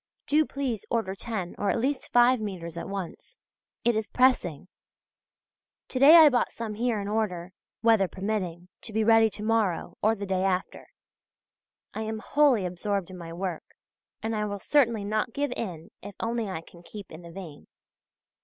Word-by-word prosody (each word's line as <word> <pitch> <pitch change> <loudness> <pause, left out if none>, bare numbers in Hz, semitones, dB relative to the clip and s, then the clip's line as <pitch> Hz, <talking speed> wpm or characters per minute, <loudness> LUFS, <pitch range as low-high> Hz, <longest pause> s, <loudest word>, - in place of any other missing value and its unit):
Do 305 +1 +3
please 260 -7 -3
order 225 -5 -1
ten 195 -3 -4
or 205 - 0
at - - +1
least 260 +3 -2
five 245 +1 +5
metres 175 -6 -5
at 170 - -6
once. 195 -4 -7 0.5
It 240 -1 +3
is 220 0 -2
pressing. 245 - +2 1.2
To 255 - -2
day 290 +5 +9
I 320 -2 +10
bought 250 -3 +1
some 230 -2 -5
here 230 0 0
in 200 - -4
order, 190 -4 -2 0.3
weather 225 -4 +4
permitting, 185 -3 -4
to 220 - -9
be 220 +1 +2
ready 225 0 +5
to 210 - -6
morrow 215 -5 0
or 220 +2 +3
the 200 -1 -5
day 190 -1 0
after. 185 -1 -2 1.1
I 220 - -4
am 220 0 -3
wholly 255 -3 +3
absorbed 185 +1 -2
in 185 - -9
my 165 -1 -8
work, 175 -1 -5 0.5
and 225 0 -1
I 210 0 -1
will 205 -1 -3
certainly 235 -2 +2
not 215 +3 -1
give 285 0 -1
in 170 -7 -6
if 200 -1 -9
only 230 -2 -2
I 185 -4 -4
can 170 +1 -16
keep 200 +3 -11
in 160 - -10
the 170 -1 -11
vein. 165 -5 -10
210 Hz, 180 wpm, -27 LUFS, 185-230 Hz, 1.2 s, I